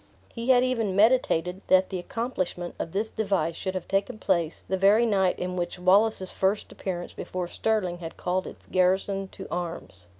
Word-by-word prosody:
He 235 +2 -4
had 250 -1 +6
even 230 -7 0
meditated 195 -5 +3
that 185 +1 +4
the 185 - -2
accomplishment 185 -4 -3
of 165 - -3
this 210 +4 -2
device 195 -7 0
should 190 -1 -4
have 185 - -4
taken 195 +2 0
place 170 -6 0
the 190 - 0
very 200 +5 +5
night 195 -4 +2
in 180 0 -3
which 175 0 -3
Wallace's 190 +2 +3
first 195 +2 0
appearance 175 -2 -5
before 180 -1 -4
Stirling 185 -3 -1
had 165 -2 -8
called 185 +1 -1
its - - -9
garrison 190 +1 +1
to - - -10
arms. 165 - -5
190 Hz, 175 wpm, -27 LUFS, 180-210 Hz, -, had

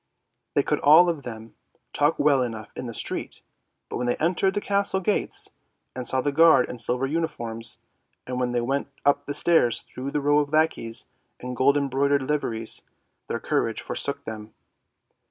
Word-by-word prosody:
They - - +3
could - - 0
all 160 +5 +6
of 165 -4 -2
them 115 -3 -9 0.4
talk 145 +2 +2
well 145 -3 +3
enough 110 -4 -5
in 125 - -6
the 115 - -6
street, - - -3 0.4
but - - -5
when 125 - -2
they 120 - +1
entered 185 +4 0
the - - +1
castle 200 -1 0
gates, 200 +2 0 0.4
and 125 -1 -5
saw 130 - +2
the 145 - 0
guard 160 -3 +5
in 125 - -7
silver 125 +3 +2
uniforms, 120 -7 -2 0.5
and 125 0 -4
when 125 -1 0
they 120 0 0
went 135 +4 -1 0.2
up 145 0 +2
the 145 - -3
stairs 145 -8 +4
through 130 +2 -7
rows 145 0 +2
of 145 - -16
lackeys 155 -8 +1 0.3
in 125 0 -6
gold 135 +3 +3
embroidered 140 0 +1
liveries, 120 -6 -1 0.5
their - - -3
courage - - -1
forsook - - -2
them. 110 -1 -8
135 Hz, 170 wpm, -25 LUFS, 120-150 Hz, 0.5 s, all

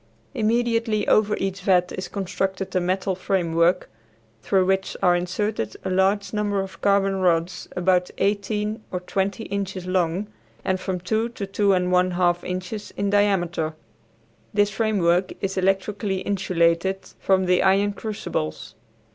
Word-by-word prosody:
Immediately 230 -1 +1
over 215 0 +3
each 195 0 -3
vat 180 -2 +3
is 185 -1 -5
constructed 190 0 -3
a - - +4
metal 185 +2 0
framework, 175 -1 +1 0.5
through 190 - +2
which 190 0 0
are 180 -1 +5
inserted 175 - -2
a 190 - -1
large 195 +3 +1
number 205 -1 0
of 190 -3 -6
carbon 195 -1 +2
rods 170 -2 0
about 180 0 +2
eighteen 210 +2 -1
or 180 - -2
twenty 195 +3 -2
inches 195 -3 -4
long 185 +1 0 0.4
and 185 0 +1
from 185 -1 -3
two 220 +6 -1
to 220 -4 -5
two 200 +1 +2
and 180 -1 +1
one 180 0 +4
half 175 -1 +2
inches 185 +3 -5
in 200 0 0
diameter. 175 -6 +1 0.8
This 205 0 +3
framework 195 -4 +1
is 195 0 -2
electrically 195 +1 0
insulated 185 -1 +1 0.2
from 190 -1 +2
the 180 0 +3
iron 200 +2 +3
crucibles. 200 - -4
190 Hz, 140 wpm, -24 LUFS, 180-205 Hz, 0.8 s, are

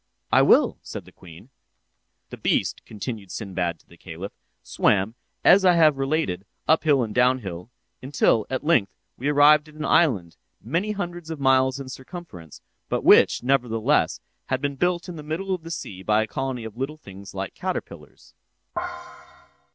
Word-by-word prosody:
"I - - +6
will," - - +4
said - - -8
the - - -16
queen. 85 +7 -15 0.8
"'The - - -7
beast,' - - 0
continued 105 -2 -6
Sinbad 90 -6 -3
to - - -34
the 85 - -18
caliph, 85 +5 -8 0.3
'swam, 100 +2 +1 0.3
as 190 +2 +6
I 180 -1 +6
have 155 -4 +4
related, 135 - -1 0.2
up 160 +1 +3
hill 140 -5 +4
and 110 -2 -5
down 125 +2 +4
hill 90 0 -7 0.3
until, 130 -5 +1
at 130 +1 -3
length, 130 - +2 0.2
we 130 - -4
arrived 150 +1 +5
at 155 - -17
an 155 0 -5
island, 105 - +2 0.2
many 175 - -2
hundreds 175 -4 -5
of 160 -2 -5
miles 130 0 +3
in 135 - -7
circumference, 130 - -10 0.3
but - - -1
which, - - +5
nevertheless, 120 -4 +1 0.3
had 130 - 0
been 140 0 -2
built 175 +5 0
in 175 -2 -7
the - - -7
middle 165 +6 -3
of 180 - -3
the 165 - -10
sea 95 - -6
by 105 +2 +2
a - - -6
colony 130 0 -4
of 110 -1 -8
little 135 +5 -4
things 100 -8 -12
like 95 0 -4
caterpillars. 185 0 -7
130 Hz, 170 wpm, -24 LUFS, 105-155 Hz, 0.8 s, I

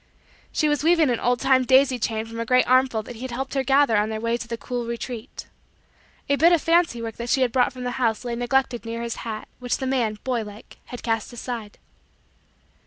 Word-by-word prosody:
She 305 - +1
was 295 -1 0
weaving 325 -4 +4
an 235 - 0
old 245 0 +1
time 265 -1 +3
daisy 260 0 +4
chain 220 0 -2
from 230 0 -8
a - - 0
great 250 +2 +4
armful 255 -3 +3
that 240 +1 -9
he - - -11
had 260 - -4
helped 265 +3 -4
her 270 -1 0
gather 270 -2 +4
on 210 +1 +1
their 220 0 -3
way 230 +1 0
to 240 0 -6
the 230 0 -4
cool 240 0 -4
retreat. 235 +1 -6 0.8
A 280 - +2
bit 335 +4 +5
of 345 - +5
fancy 330 -8 +2
work 225 -1 -6
that 235 0 -5
she 265 - +2
had 245 - 0
brought 255 +1 +2
from 255 -1 -8
the 250 - -2
house 225 0 0
lay 240 -1 -2
neglected 245 0 0
near 230 0 -5
his 235 -1 -4
hat, 220 -2 -6
which 245 -1 -1
the 265 - -4
man, 240 -5 0
boy 250 -3 -1
like, 210 0 -11
had 245 - -9
cast 225 -1 -1
aside. 235 -3 -6
245 Hz, 235 wpm, -24 LUFS, 230-265 Hz, 0.8 s, bit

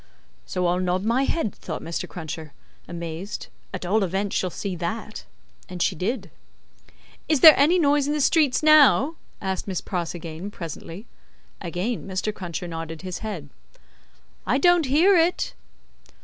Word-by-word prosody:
"So 180 - -1
I'll 175 +1 +2
nod 185 +1 0
my 235 +5 +2
head," 270 - -1
thought - - -7
Mr. 165 0 -4
Cruncher, 160 -3 -7 0.3
amazed, 170 +3 -6 0.2
"at 185 -1 -5
all 205 +4 +2
events 195 +2 -2
she'll 185 - 0
see 190 +1 -4
that." 175 - -5 0.4
And 180 - -7
she 185 - +1
did. 190 - -3 1.0
"Is 305 -5 +2
there 315 - +12
any 305 +6 +4
noise 290 -3 +3
in 295 - 0
the 300 - -1
streets 295 -1 +3
now?" 305 -1 +6 0.3
asked 190 0 -3
Miss 190 -3 -2
Pross 175 -2 -4
again, 165 +3 -7
presently. 170 +2 -8 0.6
Again 190 +6 -3
Mr. 190 +3 -2
Cruncher 175 -2 -5
nodded 165 0 -6
his 185 -1 -5
head. 175 -10 -6 0.9
"I 240 +8 +1
don't 345 0 +4
hear 335 +9 +5
it." 340 - +2
190 Hz, 150 wpm, -24 LUFS, 175-270 Hz, 1.0 s, there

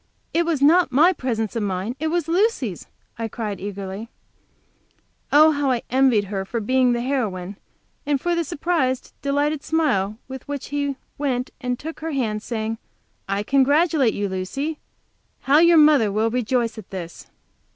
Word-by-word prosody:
"It 335 0 +1
was 305 -5 0
not 335 +3 +5
my 320 +8 +5
presence 230 - -3
of 230 - -1
mind, 200 +3 -2
it 315 - -1
was 335 -1 -1
Lucy's!" 335 - 0 0.3
I 225 - -2
cried, 215 -3 -5
eagerly. 200 +2 -6 1.2
Oh, 310 +2 +7
how 285 -2 0
I 245 -3 0
envied 255 -5 +4
her 195 -1 -4
for 230 +5 -3
being 255 +3 +2
the 240 - -1
heroine, 205 -8 -2 0.5
and 290 -1 0
for 350 +5 0
the 340 0 +1
surprised, 290 -5 -1
delighted 285 +1 0
smile 215 -11 0
with 265 -1 -9
which 285 -2 -5
he 285 -1 -1 0.2
went 255 -3 -1
and 250 -1 -2
took 320 +5 -7
her 320 0 -4
hand, 220 -6 -1
saying, 220 -1 -3 0.5
"I 200 +1 0
congratulate 275 +1 +3
you, 205 0 -1
Lucy! 270 +12 -3 0.6
How 280 +3 +4
your 340 0 +6
mother 295 -9 +5
will 220 +2 +1
rejoice 240 -1 0
at 210 - -12
this!" 175 -3 -8
260 Hz, 160 wpm, -22 LUFS, 215-295 Hz, 1.2 s, Oh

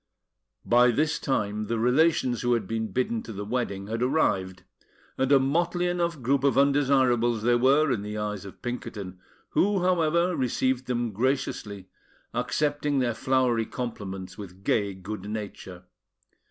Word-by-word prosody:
By 125 +1 +5
this 150 +6 +1
time, 105 -5 -1
the 115 +1 -1
relations 125 +1 +2
who 120 0 +2
had 115 -4 0
been 110 +2 -2
bidden 115 0 -1
to 115 - -9
the 105 -1 -6
wedding 105 -4 -2
had 115 +3 -4
arrived; 95 -10 0 0.5
and 135 +1 0
a 140 - +8
motley 175 +6 +1
enough 170 -5 -1
group 135 +2 +1
of 140 - +2
undesirables 130 -5 +3
they 120 +1 +3
were 135 +5 +4
in 115 -5 0
the 105 +1 -5
eyes 105 -2 -3
of 100 - -12
Pinkerton, 105 -6 -6 0.3
who, 195 -2 +2
however, 170 0 +2
received 130 0 0
them 120 -2 -1
graciously, 105 -4 -2 0.5
accepting 145 +4 0
their 125 -3 +1
flowery 125 -2 +1
compliments 95 -6 -6
with 95 -1 -10
gay 100 -2 0
good 100 +2 -7
nature. 100 -4 -7
120 Hz, 150 wpm, -26 LUFS, 105-140 Hz, 0.5 s, a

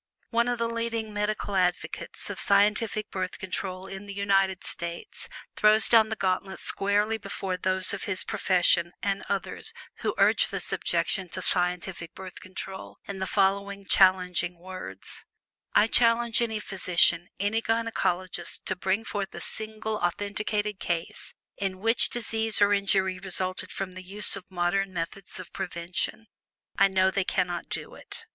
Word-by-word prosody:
One 235 0 +3
of 245 0 0
the 230 0 0
leading 230 -2 -2
medical 210 -1 -1
advocates 180 -1 -1
of - - -6
scientific 210 +1 +2
Birth 185 -1 -3
Control 185 0 -4
in 195 +1 -8
the 200 - -7
United 195 -2 +2
States 170 0 -4 0.3
throws 215 +1 +5
down 220 -2 +6
the 220 - -1
gauntlet 190 -1 -1
squarely 205 +2 0
before 195 -2 -3
those 185 +1 +1
of 200 - -3
his 195 -2 0
profession, 180 -4 +2
and 200 -1 0
others, 200 -1 -2 0.2
who - - -2
urge - - +4
this - - +1
objection 190 -2 0
to 185 - -4
scientific 180 -1 -1
Birth 185 -1 -9
Control, 190 +1 -8
in 200 -1 -5
the 190 - -2
following 200 +1 +1
challenging 180 -2 +4
words: 170 - -9 0.5
"I - - +7
challenge 230 0 +3
any 220 -2 0
physician, 180 -3 +2
any 205 +3 +1
gynecologist, 185 -6 -1
to 185 - 0
bring 190 +4 0
forth 200 -4 -3
A - - -5
SINGLE 220 0 -4
AUTHENTICATED 205 +2 -1
CASE 170 -1 -3 0.2
in 195 -2 -2
which 225 +5 +3
disease 225 -2 +1
or 205 0 +5
injury 190 -2 +2
resulted 185 -1 -1
from 195 -1 -4
the 185 0 -8
use 195 +2 -1
of 190 -2 -9
modern 190 +2 0
methods 180 +3 -4
of 185 - -10
prevention. 180 +4 -3 0.5
I 195 - +6
know 190 0 +3
they 195 0 +1
cannot 175 -2 -1
do - - -4
it." 460 - -9
195 Hz, 150 wpm, -27 LUFS, 185-210 Hz, 0.5 s, I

